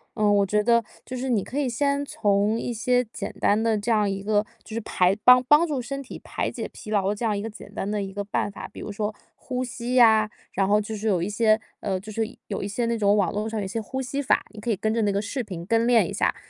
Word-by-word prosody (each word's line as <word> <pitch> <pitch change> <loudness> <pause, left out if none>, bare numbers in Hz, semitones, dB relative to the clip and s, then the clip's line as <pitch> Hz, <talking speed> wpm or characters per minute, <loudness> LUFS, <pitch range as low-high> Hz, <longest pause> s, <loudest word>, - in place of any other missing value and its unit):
嗯， 210 -2 +3
我 200 - +3
觉 210 +2 +1
得 235 +1 +3 0.2
就 255 - -6
是 260 +1 -3
你 225 -5 +2
可 270 - -6
以 285 -3 +1
先 280 +4 0
从 205 -4 +1
一 240 - -3
些 245 +2 +2
简 - - -4
单 210 +2 +3
的， 225 -1 +2
这 210 +3 -4
样 210 -3 +3
一 195 0 -3
个 210 +1 +1 0.2
就 220 - -11
是 230 - -2
排 185 -1 +2
帮 250 0 +8
帮 295 +4 +6
助 290 -6 -2
身 275 +3 -5
体 265 - -9
排 - - -3
解 - - -5
疲 215 - -9
劳 200 -1 +1
这 210 - -7
样 215 -3 +1
一 - - -3
个 225 - -4
简 205 -1 -12
单 200 - -3
的 210 -1 -1
一 195 - -6
个 205 +1 -4
办 205 - -1
法。 - - -8
比 - - -9
如 - - -5
说 210 +1 -3 0.2
呼 255 -1 -3
吸 245 0 -4
呀， 220 -3 +6 0.2
然 195 -1 +1
后 210 +1 +4
就 215 +1 -5
是 215 +2 -3
有 185 -5 +2
一 185 - -2
些 215 +1 +3 0.2
呃， 195 -2 -1
就 205 +4 -9
是 225 +1 -1 0.2
有 200 - -3
一 195 - -3
些 225 +4 -1
那 235 - 0
种 205 -1 +3
网 200 -3 +2
络 210 +1 -2
上 225 0 -3
有 - - -3
一 - - -3
些 225 - -2
呼 265 +5 -4
吸 275 +2 -3
法， 275 - +2
你 215 - -11
可 235 - -4
以 220 - +2
跟 215 +3 -1
着 230 - +1
那 205 - +2
个 200 - 0
视 255 +6 -3
频 180 -7 -7
跟 230 +4 +2
练 240 -2 +5
一 - - -5
下。 - - +1
215 Hz, 315 characters per minute, -25 LUFS, 205-240 Hz, 0.2 s, 帮